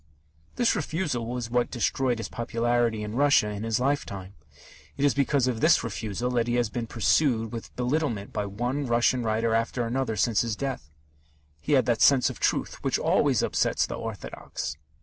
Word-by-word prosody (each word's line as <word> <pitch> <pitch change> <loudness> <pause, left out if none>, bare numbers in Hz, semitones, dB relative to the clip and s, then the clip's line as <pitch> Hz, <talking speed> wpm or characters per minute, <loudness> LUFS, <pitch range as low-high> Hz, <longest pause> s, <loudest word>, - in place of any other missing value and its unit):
This 240 - +2
refusal 155 -7 -2
was 120 -1 -4
what 120 0 +1
destroyed 125 0 0
his 115 - -4
popularity 115 -1 0
in 105 0 -5
Russia, 140 -5 +4
in 105 -1 -5
his 115 0 0
lifetime. 100 -9 -2 0.6
It 140 - +1
is 145 - +4
because 140 -1 +2
of 120 -3 -1
this 165 +1 +5
refusal 115 +1 -3
that 120 -1 +1
he 120 - 0
has 120 -3 0
been 120 -2 -3
pursued 115 +1 +1
with 115 -1 -8
belittlement 125 -5 -1
by 105 -1 -2
one 125 +7 -2
Russian 120 +1 +2
writer 110 0 0
after 115 +2 0
another 120 -1 -1
since 105 +1 +2
his 115 -2 -2
death. 130 - -4 0.7
He 150 - -1
had 130 -3 +4
that 115 -2 +1
sense 135 -3 +5
of - - -11
truth - - -1
which - - +1
always - - +2
upsets - - +1
the - - -6
orthodox. - - -6
120 Hz, 180 wpm, -26 LUFS, 110-130 Hz, 0.7 s, this